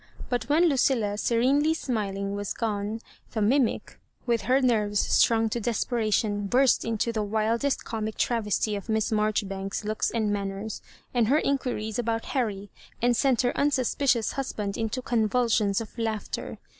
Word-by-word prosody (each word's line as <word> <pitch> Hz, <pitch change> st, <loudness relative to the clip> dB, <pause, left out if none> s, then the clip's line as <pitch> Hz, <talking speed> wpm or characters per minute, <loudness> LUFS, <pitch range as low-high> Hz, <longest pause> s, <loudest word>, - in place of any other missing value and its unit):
But 245 Hz, -3 st, -2 dB
when 310 Hz, +4 st, +4 dB
Lucilla^ 240 Hz, -8 st, +1 dB
serenely 275 Hz, +8 st, +2 dB
smiling, 200 Hz, -8 st, -2 dB
was 205 Hz, 0 st, -3 dB
gone, 215 Hz, 0 st, -2 dB, 0.3 s
the 225 Hz, -, -1 dB
mimic, 250 Hz, +3 st, +1 dB, 0.3 s
with 235 Hz, -3 st, +1 dB
her 260 Hz, +1 st, +5 dB
nerves 215 Hz, -5 st, +2 dB
stmng 225 Hz, -1 st, +3 dB
to 240 Hz, -, -1 dB
desperation, 215 Hz, -2 st, 0 dB
burst 255 Hz, +4 st, +3 dB
into 230 Hz, 0 st, -1 dB
the 220 Hz, -2 st, -2 dB
wildest 220 Hz, +6 st, 0 dB
comic 220 Hz, -1 st, -4 dB
tra* 235 Hz, -2 st, +1 dB
vesty 210 Hz, 0 st, 0 dB
of 200 Hz, +2 st, -7 dB
Miss 220 Hz, +1 st, 0 dB
Maijoribanks 200 Hz, -2 st, -1 dB
s -, -, -18 dB
looks 215 Hz, +1 st, -1 dB
and 220 Hz, -3 st, 0 dB
manners, 200 Hz, +1 st, -4 dB, 0.3 s
and 240 Hz, -3 st, +2 dB
her 280 Hz, +5 st, +4 dB
inquiries 250 Hz, -7 st, -1 dB
about 230 Hz, -1 st, -1 dB
Harry> 205 Hz, -7 st, -2 dB, 0.3 s
and 245 Hz, 0 st, +2 dB
sent 260 Hz, -1 st, +2 dB
her 245 Hz, -, 0 dB
un 285 Hz, -, +3 dB
suspicious 255 Hz, -3 st, +1 dB
husband 210 Hz, -7 st, -3 dB
into 225 Hz, +3 st, -3 dB
convulsions 220 Hz, -3 st, +1 dB
of 225 Hz, -2 st, -8 dB
laughter. 220 Hz, -2 st, -3 dB
225 Hz, 155 wpm, -26 LUFS, 210-245 Hz, 0.3 s, her